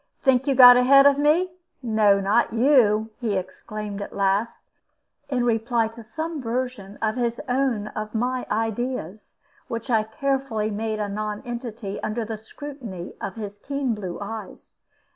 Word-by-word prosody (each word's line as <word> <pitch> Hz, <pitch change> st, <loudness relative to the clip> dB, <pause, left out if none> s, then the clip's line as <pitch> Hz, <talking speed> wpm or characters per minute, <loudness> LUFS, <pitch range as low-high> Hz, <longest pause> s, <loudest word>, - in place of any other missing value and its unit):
"Think 265 Hz, 0 st, +3 dB
you 275 Hz, -, +2 dB
got 245 Hz, -1 st, +10 dB
ahead 275 Hz, +2 st, +6 dB
of 285 Hz, 0 st, +5 dB
me? 320 Hz, +5 st, +3 dB, 0.3 s
No, 215 Hz, -4 st, +4 dB
not 205 Hz, +5 st, +2 dB
you," 225 Hz, -4 st, +4 dB
he 215 Hz, -5 st, 0 dB
exclaimed 205 Hz, +2 st, -6 dB
at -, -, -7 dB
last, 200 Hz, +3 st, 0 dB, 0.6 s
in 250 Hz, -3 st, 0 dB
reply 230 Hz, 0 st, +1 dB
to 230 Hz, +1 st, -12 dB
some 315 Hz, +7 st, -5 dB
version 235 Hz, -4 st, -4 dB
of 220 Hz, +2 st, 0 dB
his 235 Hz, -1 st, -1 dB
own 245 Hz, -5 st, 0 dB
of 215 Hz, +1 st, -6 dB
my 250 Hz, +3 st, -1 dB
ideas, 225 Hz, -3 st, -3 dB, 0.3 s
which 230 Hz, +2 st, -4 dB
I 220 Hz, -2 st, +4 dB
carefully 225 Hz, -1 st, -2 dB
made 215 Hz, +1 st, -2 dB
a 210 Hz, -, -1 dB
nonentity 215 Hz, +1 st, -5 dB
under 220 Hz, +1 st, -2 dB
the 220 Hz, 0 st, -5 dB
scrutiny 225 Hz, -, -8 dB
of 195 Hz, -, -4 dB
his 205 Hz, -2 st, -7 dB
keen 275 Hz, 0 st, -2 dB
blue 190 Hz, -5 st, -5 dB
eyes. 210 Hz, 0 st, -8 dB
225 Hz, 150 wpm, -24 LUFS, 210-255 Hz, 0.6 s, got